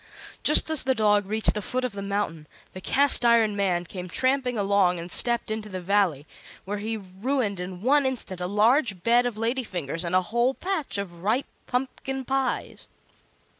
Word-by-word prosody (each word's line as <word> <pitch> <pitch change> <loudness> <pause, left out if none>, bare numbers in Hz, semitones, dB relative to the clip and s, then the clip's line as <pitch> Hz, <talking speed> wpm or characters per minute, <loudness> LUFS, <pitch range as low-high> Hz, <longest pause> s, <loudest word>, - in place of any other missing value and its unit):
Just 300 +1 +6
as 315 - +5
the 260 0 +1
dog 210 -3 +2
reached 215 +1 +2
the 210 - -3
foot 255 +5 -2
of 250 - -3
the 200 0 -7
mountain 195 -6 -3 0.3
the 185 - -8
Cast 280 +5 +2
iron 230 -3 +4
Man 180 -3 0
came 180 +1 -7
tramping 255 +3 +1
along 195 -3 +2
and 170 +1 -7
stepped 235 -2 0
into 215 -1 -4
the 185 -2 -5
Valley, 180 -6 +1 0.4
where 205 +2 -4
he 220 +2 -3
ruined 205 +2 -2
in 180 +1 -7
one 280 +2 +3
instant 210 -8 -5
a 180 - -2
large 210 - +2
bed 240 +1 +3
of 230 -3 -5
lady 235 +4 -1
fingers 165 - -4
and 175 +1 -1
a 185 - +5
whole 240 +3 +2
patch 360 - -2
of 175 -4 -6
ripe 220 +8 0 0.2
pumpkin 265 +1 -3
pies. 270 0 -2
210 Hz, 185 wpm, -25 LUFS, 185-255 Hz, 0.4 s, Just